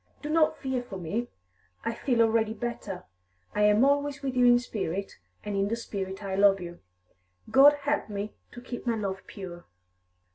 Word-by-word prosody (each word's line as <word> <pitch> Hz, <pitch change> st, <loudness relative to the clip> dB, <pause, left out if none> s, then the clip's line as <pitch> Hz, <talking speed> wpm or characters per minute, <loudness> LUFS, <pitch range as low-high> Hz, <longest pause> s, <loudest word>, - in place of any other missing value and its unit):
Do 300 Hz, -, -3 dB
not 315 Hz, -1 st, +3 dB
fear 265 Hz, -2 st, -2 dB
for 220 Hz, -6 st, -8 dB
me; 200 Hz, +8 st, -3 dB, 0.6 s
I 230 Hz, -, 0 dB
feel 235 Hz, -1 st, +2 dB
already 225 Hz, -1 st, +2 dB
better. 215 Hz, -5 st, -5 dB, 0.5 s
I 210 Hz, -, 0 dB
am 210 Hz, +4 st, +5 dB
always 285 Hz, 0 st, +1 dB
with 265 Hz, -2 st, -2 dB
you 250 Hz, -1 st, +5 dB
in 240 Hz, 0 st, +7 dB
spirit, 200 Hz, -6 st, -4 dB, 0.2 s
and 205 Hz, -1 st, -3 dB
in 195 Hz, 0 st, +1 dB
the 225 Hz, -, 0 dB
spirit 195 Hz, -4 st, -5 dB
I 195 Hz, -1 st, -3 dB
love 195 Hz, 0 st, +5 dB
you; 175 Hz, -1 st, -8 dB, 0.7 s
God 280 Hz, +2 st, +8 dB
help 290 Hz, -4 st, 0 dB
me 205 Hz, +1 st, -4 dB, 0.2 s
to 240 Hz, -, -9 dB
keep 245 Hz, 0 st, -7 dB
my 235 Hz, -, +2 dB
love 195 Hz, -3 st, -3 dB
pure!" 175 Hz, -4 st, -9 dB
225 Hz, 180 wpm, -28 LUFS, 195-250 Hz, 0.7 s, God